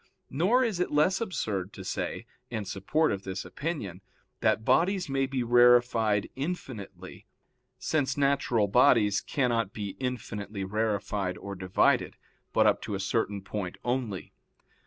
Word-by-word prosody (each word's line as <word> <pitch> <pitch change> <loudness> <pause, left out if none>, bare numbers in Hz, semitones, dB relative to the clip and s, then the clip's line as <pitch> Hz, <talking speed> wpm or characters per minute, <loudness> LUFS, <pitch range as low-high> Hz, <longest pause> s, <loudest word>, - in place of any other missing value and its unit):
Nor 195 - +3
is 220 -7 -1
it 180 - 0
less 155 +7 +2
absurd 105 - -3
to 95 - -9
say, - - -4 0.2
in 110 -4 -4
support 100 +12 0
of 100 - -2
this 95 0 -5
opinion, 140 - -5 0.4
that 110 - +1
bodies 180 +8 +2
may 135 -1 0
be 130 -2 -1
rarefied 120 -3 +4
infinitely, 135 - -6 0.5
since 145 -4 -1
natural 135 -6 +2
bodies 105 -2 +4
cannot 115 -7 0
be 105 -2 -4
infinitely 105 -6 -4
rarefied 100 -2 -1
or 100 - -7
divided, 95 -1 +1 0.3
but - - +3
up - - +3
to 105 - -4
a - - -3
certain 100 -1 -1
point 100 -3 -5
only. 120 -6 -3
115 Hz, 135 wpm, -28 LUFS, 100-140 Hz, 0.5 s, rarefied